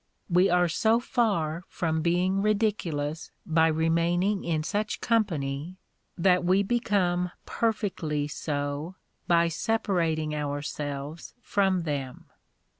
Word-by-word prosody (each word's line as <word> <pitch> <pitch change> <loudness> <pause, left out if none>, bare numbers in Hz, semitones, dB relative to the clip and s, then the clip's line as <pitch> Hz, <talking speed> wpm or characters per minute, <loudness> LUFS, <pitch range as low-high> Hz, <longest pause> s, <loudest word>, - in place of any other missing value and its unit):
We 180 +3 +5
are 180 0 +3
so 220 +7 +2
far 200 -11 0
from 160 -2 -1
being 180 +3 +1
ridiculous 185 -8 -1 0.2
by 160 0 +3
remaining 170 +5 +1
in 160 -2 -1
such 210 +5 -2
company, 170 - -1 0.4
that 180 0 +3
we 185 +3 +3
become 190 -6 +1 0.2
perfectly 185 -10 -1
so 145 +3 -3 0.3
by 170 -1 +4
separating 165 -5 0
ourselves 145 +1 -4
from 190 -6 +1
them. 140 -5 -4
170 Hz, 105 wpm, -27 LUFS, 155-195 Hz, 0.4 s, We